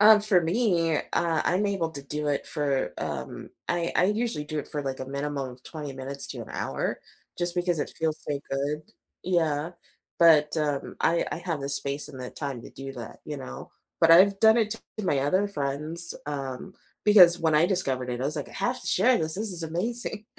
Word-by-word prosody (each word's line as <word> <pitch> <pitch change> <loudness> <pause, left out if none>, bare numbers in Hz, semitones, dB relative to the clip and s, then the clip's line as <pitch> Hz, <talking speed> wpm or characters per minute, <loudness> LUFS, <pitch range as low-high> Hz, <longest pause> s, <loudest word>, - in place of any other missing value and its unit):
Um, 210 0 +8
for 205 -4 +4
me, 170 -3 +2
uh, 165 -2 0
I'm 190 +4 +2
able 190 -5 -1
to 140 - -7
do 150 +2 -4
it 145 - -1
for, 145 -3 -1
um, 65 - -5 0.2
I 170 -1 0
I - - +4
usually 215 -6 -1
do 155 +1 -4
it 145 - -5
for, 145 -1 -3
like, 135 -1 -3
a 130 - -3
minimum 140 -1 -3
of 125 +1 -14
20 150 -4 -6
minutes 135 +1 -6
to - - -6
an - - -11
hour - - -2 0.4
just 175 0 -1
because 175 -2 0
it - - -3
feels 160 -1 -1
so 145 - 0
good. 145 +3 -1 0.4
Yeah, 165 -3 +1 0.5
but, 155 -2 +6
um, 145 -3 -1
I 170 +1 +3
I - - -2
have 170 -4 -3
the 140 - -3
space 140 +1 -2
and 130 - -9
the 125 - -5
time 135 -5 -5
to - - -11
do 135 0 -7
that, 120 -3 -8
you - - -5
know, 65 0 -8 0.3
but 165 0 +6
I've 195 +4 +7
done 220 +1 +7
it 220 -2 +2 0.3
to 210 - -3
my 145 - +2
other 185 +9 +2
friends, 155 +1 -3
um, 140 +5 -5 0.3
because 180 -5 +8
when 160 -2 +2
I 155 +3 +5
discovered 135 -10 -1
it, 120 0 -3
I - - -1
was 150 +3 -1
like, 145 - -4
"I - - -14
have 245 +1 -1
to - - -9
share 240 +6 +4
this, 155 0 -1
this 210 0 -2
is 175 -2 -4
amazing, 215 +6 -2
160 Hz, 215 wpm, -27 LUFS, 140-185 Hz, 0.5 s, Um